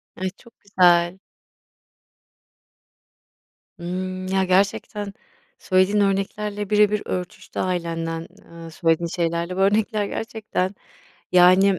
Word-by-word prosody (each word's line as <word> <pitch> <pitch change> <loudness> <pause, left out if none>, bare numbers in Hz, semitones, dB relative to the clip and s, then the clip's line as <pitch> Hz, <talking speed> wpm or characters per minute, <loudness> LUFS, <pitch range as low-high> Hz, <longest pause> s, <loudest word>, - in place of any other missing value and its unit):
Ay, 185 0 -2
çok 235 - -19
güzel. 175 -2 +3 2.6
Hımm. 185 +1 -4
Ya, 190 0 +1
gerçekten, 200 +2 0 0.5
söylediğin 185 +3 +2
örneklerle 200 +1 -1
birebir 210 0 +3
örtüştü 180 -1 -5
ailenden, 165 -2 -2 0.2
eee, 165 0 -11
söylediğin 165 +1 +1
şeylerle 170 +1 -2
bu - - -4
örnekler. 210 +2 +2
Gerçekten. 210 -4 -3 0.6
Yani, 185 +2 +6
185 Hz, 90 wpm, -23 LUFS, 175-200 Hz, 2.6 s, Yani